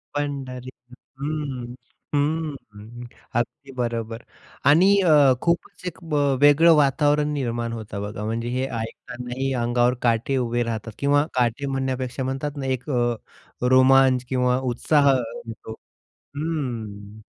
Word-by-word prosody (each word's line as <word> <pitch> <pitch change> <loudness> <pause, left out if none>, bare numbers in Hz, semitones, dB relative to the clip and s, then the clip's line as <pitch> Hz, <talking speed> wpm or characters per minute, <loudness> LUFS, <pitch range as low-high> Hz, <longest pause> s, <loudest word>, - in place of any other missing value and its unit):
पंढरी 135 -3 -4 0.5
हं, 140 -5 -4 0.4
हं 140 -7 -3 0.3
अगदी 135 +3 -5
बरोबर. 115 -1 -3 0.4
आणि 165 +8 +6
अ, 150 -7 +6
खूपच 170 +1 -1
एक 180 - -5 0.5
वेगळं 155 +3 +7
वातावरण 150 +1 +2
निर्माण 120 -4 -2
होतं 105 -3 -6
बघा. 105 +1 -5
म्हणजे 115 +2 -2
हे 130 +2 -1
ऐकतांनाही 125 +3 -5
अंगावर 120 +1 +2
काटे 120 +3 +1
उभे 120 -1 0
राहतात 115 -1 -4
किंवा 145 +1 +3
काटे 125 +2 0
म्हणण्यापेक्षा 130 -1 -2
म्हणतात 135 +3 -3
ना 135 - -4
एक 125 - -14
अ, 120 -3 +1 0.6
रोमांच 130 0 +5
अ, - - -27
किंवा 125 -1 +2 0.2
उत्साह 140 +3 +3 0.4
येतो. 110 0 -8 0.6
हम्म. 115 -9 -4
130 Hz, 120 wpm, -23 LUFS, 120-145 Hz, 0.6 s, वेगळं